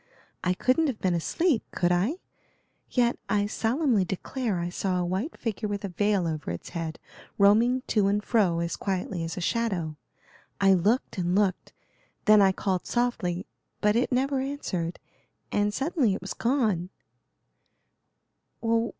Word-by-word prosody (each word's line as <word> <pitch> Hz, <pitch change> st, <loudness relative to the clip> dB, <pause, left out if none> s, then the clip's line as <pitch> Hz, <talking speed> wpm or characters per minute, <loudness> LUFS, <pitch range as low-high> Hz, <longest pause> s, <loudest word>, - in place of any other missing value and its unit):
I 180 Hz, 0 st, +1 dB
couldn't 260 Hz, -, +2 dB
have 255 Hz, -6 st, -3 dB
been 185 Hz, -2 st, +1 dB
asleep, 255 Hz, -, +1 dB
could 175 Hz, -1 st, 0 dB
I? 190 Hz, -, +2 dB, 0.7 s
yet, 240 Hz, -1 st, +1 dB
I 205 Hz, -1 st, +2 dB
solemnly 230 Hz, +1 st, +1 dB
declare 205 Hz, +3 st, -2 dB
I 170 Hz, 0 st, -2 dB
saw 185 Hz, +1 st, -1 dB
a 180 Hz, -, 0 dB
white 190 Hz, -, -2 dB
figure 220 Hz, -1 st, -3 dB
with 205 Hz, 0 st, -3 dB
a -, -, -4 dB
veil 200 Hz, 0 st, +1 dB
over 155 Hz, -2 st, -3 dB
its 85 Hz, 0 st, -5 dB
head 165 Hz, -2 st, -4 dB, 0.4 s
roaming 230 Hz, +6 st, +4 dB
to 210 Hz, -3 st, +3 dB
and 205 Hz, +1 st, +1 dB
fro 190 Hz, -9 st, +2 dB
as 170 Hz, 0 st, -2 dB
quietly 185 Hz, -2 st, -2 dB
as 165 Hz, 0 st, -5 dB
a -, -, -3 dB
shadow. 175 Hz, -7 st, -1 dB, 0.6 s
I 195 Hz, -1 st, +5 dB
looked 200 Hz, +4 st, +1 dB
and 175 Hz, 0 st, 0 dB
looked, 195 Hz, -3 st, 0 dB, 0.5 s
then 215 Hz, -1 st, +7 dB
I 195 Hz, -1 st, +6 dB
called 190 Hz, -1 st, -2 dB
softly, 205 Hz, -7 st, -1 dB, 0.3 s
but 210 Hz, 0 st, +2 dB
it 245 Hz, +3 st, +1 dB
never 265 Hz, +2 st, +1 dB
answered, 215 Hz, -, -3 dB, 0.5 s
and 205 Hz, 0 st, +1 dB
suddenly 270 Hz, -, +1 dB
it -, -, -6 dB
was 190 Hz, -, -5 dB
gone." 220 Hz, -9 st, 0 dB
205 Hz, 150 wpm, -27 LUFS, 180-240 Hz, 0.7 s, then